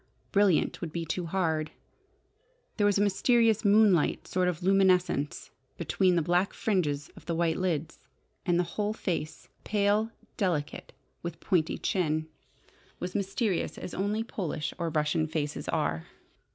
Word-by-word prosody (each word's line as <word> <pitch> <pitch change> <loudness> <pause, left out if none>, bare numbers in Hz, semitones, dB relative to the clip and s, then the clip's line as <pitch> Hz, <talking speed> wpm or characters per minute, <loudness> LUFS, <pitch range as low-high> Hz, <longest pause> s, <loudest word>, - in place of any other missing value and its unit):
"Brilliant" 200 -4 +3
would 170 -3 -4
be 170 0 -3
too 170 +2 -3
hard. 160 -4 0 1.1
There 205 -2 +3
was 205 - +3
a 205 - +3
mysterious, 225 +2 +3
moonlight 205 -5 +4
sort 185 0 +1
of 180 0 -2
luminance 185 -6 +2 0.3
between 185 -2 +2
the 170 - +2
black 175 +4 +1
fringes 150 -9 0
of - - -15
the 170 - -1
white 165 -1 +1
lids, 165 -4 -2 0.4
and 175 -2 +2
the 175 - +3
whole 205 +5 -2
face 170 -7 -4 0.2
pale, 210 +1 +2 0.3
delicate, 170 -8 -2 0.3
with 170 -1 -6
pointed 175 -4 0
chin 155 -4 0 0.7
was 180 0 -4
mysterious 200 -1 -1
as - - -7
only 205 +3 -1
Polish 165 -9 -4
or 170 -1 -1
Russian 155 0 +1
faces 150 -2 -3
are. 80 +1 -1
180 Hz, 140 wpm, -29 LUFS, 160-200 Hz, 1.1 s, moonlight